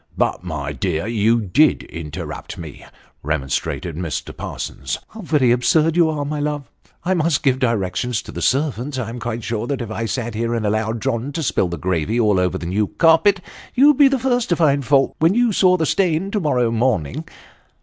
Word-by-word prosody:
" - - -26
But, - - -3
my 75 -5 -4
dear, 80 +4 -2
you 115 +1 +2
did 125 - +3
interrupt 80 -3 -7
me," 80 -4 -9 0.4
remonstrated 75 +3 -2
Mr. 85 -2 -4
Parsons. 65 -2 -5
" - - -47
How 220 - -10
very 150 - +2
absurd 155 +6 +3
you 170 -2 +4
are, 150 -2 -2
my 150 +1 -3
love! 145 -3 -3 0.3
I 185 - +1
must 165 -4 +1
give 130 -2 +2
directions 115 0 -1
to - - -10
the - - -6
servants; 135 -1 0
I 120 -3 -3
am 120 +1 -6
quite 120 0 -4
sure 115 0 -3
that 140 0 -2
if 115 -3 -5
I 115 +1 -3
sat 120 -1 -3
here 115 +2 -1
and 115 -2 -2
allowed 110 +2 -1
John 130 +1 -1
to 165 - -2
spill 100 - +1
the 85 0 -5
gravy 95 +6 -1
over 95 -5 +2
the - - -7
new 100 +4 0
carpet, 175 - +4 0.3
you'd 280 +2 +6
be 285 - +7
the 270 0 +2
first 245 -2 0
to 175 - +3
find 145 -4 +2
fault 135 +1 +2
when 165 +5 +3
you 240 -1 +3
saw 185 -2 +4
the 160 - 0
stain 185 +2 +1
to 210 - 0
morrow 125 -9 +1
morning." 115 - 0
125 Hz, 205 wpm, -20 LUFS, 105-155 Hz, 0.4 s, be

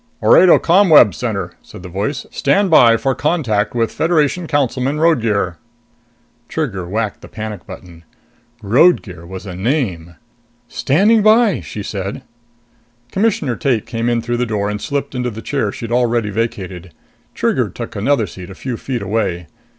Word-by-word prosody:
"Orado 180 -1 +7
ComWeb 165 - +5
Center," - - -3
said 90 - -13
the - - -7
voice. 100 - -3
"Stand 175 +7 +1
by 115 -7 +6
for 135 +3 0
contact 125 -8 -1
with 115 -1 0
Federation 165 +1 0
Councilman 140 -1 0
Roadgear." 115 - +1 0.9
Trigger 100 - -3
whacked 110 0 -2
the - - -11
panic 110 -1 -7
button. 85 -2 -11 0.6
Roadgear 100 - +2
was 95 +2 -8
a 95 - -7
NAME! 95 - -2 0.5
"Standing 190 - +2
by," 215 -2 +4
she 105 - -7
said. 100 +5 -5 0.9
Commissioner 190 - 0
Tate 120 -3 0
came 115 +1 -2
in 120 -1 0
through 120 +1 -2
the 125 0 -1
door 105 -2 -1
and 105 0 -5
slipped 140 -1 -3
into 125 -1 -2
the 110 -1 -8
chair 115 -4 -2
she'd 115 +2 -7
already 120 -3 +1
vacated. 95 -5 -4 0.4
Trigger - - 0
took - - -8
another 115 +3 +1
seat 90 -1 -10
a 95 - -10
few 125 +3 -5
feet 125 -4 -4
away. 95 -4 -2
115 Hz, 150 wpm, -17 LUFS, 100-145 Hz, 0.9 s, Orado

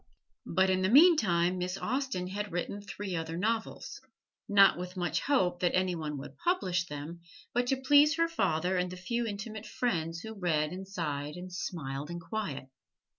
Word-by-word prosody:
But 190 +2 +3
in 185 0 +1
the 190 - +2
meantime 210 - +5
Miss 180 +1 -2
Austen 255 -7 -2
had 205 +2 -4
written 175 +4 -3
three 200 -2 -5
other 165 0 -3
novels 220 +4 -2 0.5
not 195 -1 +7
with 180 +1 -7
much 175 -3 0
hope 185 -11 +1
that 175 -1 +1
any 185 0 +2
one 155 -3 -4
would 140 +1 -9
publish 265 - 0
them, 150 +3 -7 0.3
but 245 0 +1
to 270 - +2
please 290 +3 +5
her 330 0 +2
father 180 - 0
and 180 0 -1
the 185 - -7
few 235 +5 -2
intimate 215 +1 -6
friends 165 -9 -2
who 220 +2 -7
read 160 -6 0
and 190 +1 -7
sighed 150 -6 -3
and 180 0 -8
smiled 150 -5 -4
in 175 0 -5
quiet. 170 -9 -4
185 Hz, 175 wpm, -30 LUFS, 170-220 Hz, 0.5 s, not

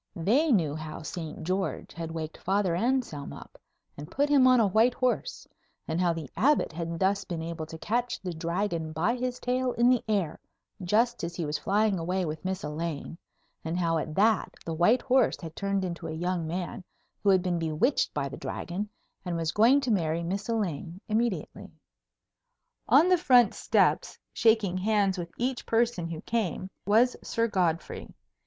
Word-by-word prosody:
They 245 - +2
knew 165 - +2
how 155 +1 -7
Saint 160 -1 -6
George 185 +3 -2
had 165 +1 -5
waked 160 -1 -6
Father 195 -2 +1
Anselm 230 - -1
up - - -12 0.4
and 145 +1 -9
put 285 +1 0
him 275 -3 +6
on 255 -1 +6
a 225 - +5
white 220 +5 +3
horse, 255 -2 -1 0.4
and 160 +2 -1
how 175 -1 +3
the 165 -3 -5
Abbot 270 - +2
had 165 0 -4
thus 195 +2 +1
been 170 -4 -5
able 165 -1 -5
to 160 - -8
catch 240 +7 -1
the 180 -2 -5
Dragon 170 -1 -2
by 180 +10 +1
his 250 0 -3
tail 250 0 0
in 240 +1 +4
the 250 - +2
air 195 -8 0 0.4
just 230 +6 +1
as 170 0 -4
he 170 - -2
was 150 +1 -2
flying 205 -1 +1
away 180 +2 -1
with 155 -1 -5
Miss 190 0 -3
Elaine, 155 +1 -4 0.5
and 160 +2 -2
how 165 -2 +1
at 155 0 -5
that 215 +1 +2
the 165 - -3
white 175 +10 +3
horse 260 -2 +3
had 160 -2 -8
turned 200 -1 -1
into 170 -2 -5
a - - -4
young 170 +1 -2
man 180 +4 -4 0.4
who 205 - +2
had 190 -2 +4
been 175 -2 0
bewitched 165 - +1
by - - -2
the - - -8
Dragon, 195 +4 -4 0.3
and 175 -2 -3
was 165 -1 -1
going 245 +7 +5
to 255 -3 -1
marry 165 -4 0
Miss 195 +6 -3
Elaine 180 -6 -2
immediately. 220 -1 -1 1.2
On 335 - +6
the 365 -1 +4
front 250 - +5
steps, - - +1 0.2
shaking 220 -5 +3
hands 200 -2 +1
with 170 -1 -5
each 250 +1 -1
person 225 -7 +1
who 165 -1 -6
came, 190 -4 -2 0.2
was 230 +5 +4
Sir 230 0 0
Godfrey. 175 -6 -1
185 Hz, 180 wpm, -28 LUFS, 165-230 Hz, 1.2 s, him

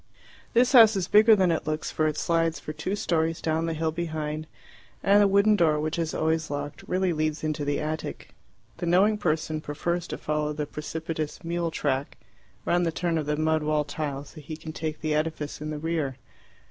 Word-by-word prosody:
This 245 +2 +4
house 225 -4 +8
is 185 -2 -1
bigger 215 +1 +7
than 185 -3 +3
it 160 - -2
looks, 155 0 -2
for 155 - +1
it 155 - -2
slides 165 -1 +1
for 155 - -6
two 155 +6 -3
storeys 165 -4 0
down 160 +1 0
the 165 - -2
hill 160 0 0
behind, 155 -2 -4 0.6
and 200 +1 +5
the 205 - +6
wooden 200 +2 +4
door, 160 -5 +3
which 155 +2 -2
is 165 -1 -2
always 160 0 0
locked, 145 +1 -5
really 185 -1 +1
leads 155 0 -1
into 155 -1 -1
the 145 0 0
attic. 155 +1 -5 0.4
The 175 - -3
knowing 200 +5 +4
person 155 -3 -1
prefers 170 +4 -2
to - - -5
follow 150 0 -1
the 150 0 -3
precipitous 155 +1 -5
mule 170 0 -1
track 140 -3 -2 0.5
round 175 0 +2
the 165 - +1
turn 165 0 -1
of 150 - -4
the 150 0 0
mud 155 0 +2
wall 150 0 +1
till 145 -1 -4
he 155 +1 -7
can 160 0 -8
take 155 -1 -4
the 155 -1 0
edifice 150 -1 -2
in 155 - -4
the 155 - -3
rear. 155 -4 -2
160 Hz, 200 wpm, -26 LUFS, 150-170 Hz, 0.6 s, house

